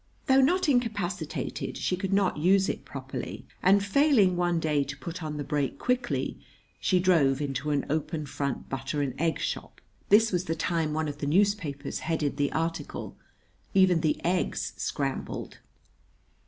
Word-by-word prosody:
Though 270 -1 +5
not 350 +7 +3
incapacitated, 205 - -1
she 180 - 0
could 190 +1 -3
not 195 -3 +2
use 190 +4 +4
it - - -4
properly; - - -6 0.2
and, 200 +2 +4
failing 215 -5 +4
one 175 -1 +1
day 150 -3 +1
to 140 +1 -7
put 170 +3 -6
on 155 -1 -4
the 145 - -3
brake 145 -1 -1
quickly, 250 0 -1 0.4
she 185 - +2
drove 160 -7 +3
into 140 0 -2
an 145 -2 +1
open 155 +1 -2
front 140 -1 -3
butter 135 +2 -2
and 135 -3 -2
egg 165 -1 +1
shop. - - -4 0.3
[This 220 +2 +6
was 180 -1 0
the 165 - -1
time 160 -3 0
one 155 0 0
of 145 0 -5
the 145 - -2
newspapers 165 -5 +1
headed 155 -3 -1
the 145 -1 +1
article: 165 -2 -3 0.6
"Even 185 -3 +5
the 155 -2 +1
Eggs 180 +1 0
Scrambled." 135 -2 -3
165 Hz, 160 wpm, -28 LUFS, 145-195 Hz, 0.6 s, This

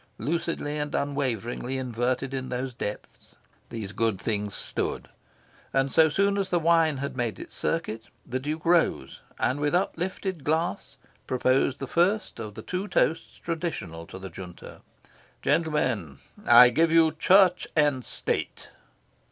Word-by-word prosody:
Lucidly, 165 -2 -2
and 150 0 -3
unwaveringly 130 -3 -2
inverted 125 +1 -2
in 130 -1 -4
the 125 +1 -3
depths 105 -3 -7 0.3
these 110 -4 -5
good 110 -3 0
things 105 -2 -2
stood; - - -3 0.6
and, 135 0 +1
so 160 -1 +5
soon 200 +5 +1
as 195 - -1
the 175 - +2
wine 165 -3 +3
had 140 +1 -4
made 120 -3 -2
its - - -10
circuit, 115 -9 -2 0.2
the 130 +2 -3
Duke 155 +4 -4
rose 165 - +2 0.2
and 130 +3 0
with 145 +3 +1
uplifted 185 -2 -2
glass 160 -1 -1 0.3
proposed 130 +1 +2
the 135 - -5
first 185 - +1
of 105 -2 -6
the 110 - -8
two 185 +3 -3
toasts 165 -4 0
traditional 155 - -4
to - - -9
the 95 0 -8
Junta. 90 -2 -10 0.6
"Gentlemen, 140 - 0 0.3
I 125 - +9
give 160 +6 +2
you 165 -1 +5
Church 180 +3 +4
and 145 -4 +2
State." - - -3
140 Hz, 145 wpm, -27 LUFS, 120-165 Hz, 0.6 s, I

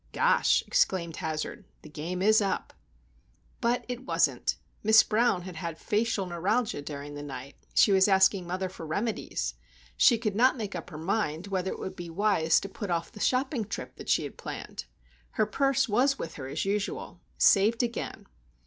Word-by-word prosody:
"Gosh!" - - +3
exclaimed 185 - +1
Hazard. 155 -3 -4 0.2
"The 155 - -11
game 170 +5 -4
is 215 +1 +5
up." 195 -2 -2 0.9
But 240 +1 +1
it 250 0 -5
wasn't. - - +1 0.3
Miss 220 +1 +7
Brown 215 -4 +1
had 180 -2 -8
had 165 0 -5
facial 215 0 0
neuralgia 190 +3 -1
during 145 0 -7
the 145 - -6
night. 140 -1 -7 0.2
She 205 - +6
was 190 0 +5
asking 190 -2 +4
mother 185 +2 -2
for 180 - -10
remedies. 160 - -2 0.4
She 235 - +5
could 215 -3 -2
not 255 +4 +4
make 210 -3 -4
up 175 -2 -6
her 155 - -8
mind 170 -1 -1
whether 190 -1 -1
it - - -4
would 190 - -5
be 175 -1 -7
wise 165 -3 +2
to - - -5
put 200 0 -6
off 170 -1 -1
the - - -12
shopping 255 +1 +1
trip 205 0 -6
that - - -9
she - - +3
had - - -7
planned. - - -7 0.5
Her - - +2
purse 275 +2 +1
was 260 +6 +2
with 165 - -5
her 130 -3 -7
as 145 +7 -3
usual. 205 +1 -3 0.2
Saved 220 +4 +4
again! 235 -1 -4
195 Hz, 180 wpm, -28 LUFS, 165-220 Hz, 0.9 s, Miss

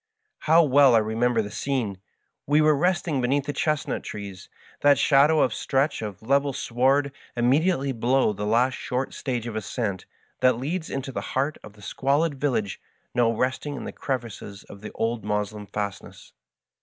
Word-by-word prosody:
How 165 +1 +7
well 140 -3 +5
I - - +7
remember 115 +1 +1
the 105 - -7
scene 135 -6 -1
1 95 -1 -10 0.5
We 145 +2 +4
were 155 0 +4
resting 170 -3 0
beneath 135 +3 +1
the 145 - -3
chestnut 150 +1 -1
trees 100 -3 -8 0.3
that 145 -1 +5
shadow 145 +3 +4
a - - -3
stretch 135 0 0
of 105 -2 -7
level 140 +3 +2
sward 135 +4 +1 0.3
immediately 140 +4 +2
below 125 -1 +1
the 105 +1 -4
last 120 +4 +2
short 130 +1 -3
stage 125 -4 -3
of 115 -2 -5
ascent 105 -2 -3 0.3
that 130 -2 +3
leads 160 +7 -3
into 135 0 -4
the - - -4
heart 140 +4 -2
of 105 - -12
the 105 -1 -17
squalid 145 +7 0
village 115 -9 -1 0.3
now 120 -2 +3
nestling 130 +5 -2
in - - -6
the - - -5
crevices 115 -6 -5
of 100 - -13
the 105 - -8
old 115 -1 -2
Moslem 105 0 -3
fastness. 100 0 -6
130 Hz, 170 wpm, -25 LUFS, 110-140 Hz, 0.5 s, How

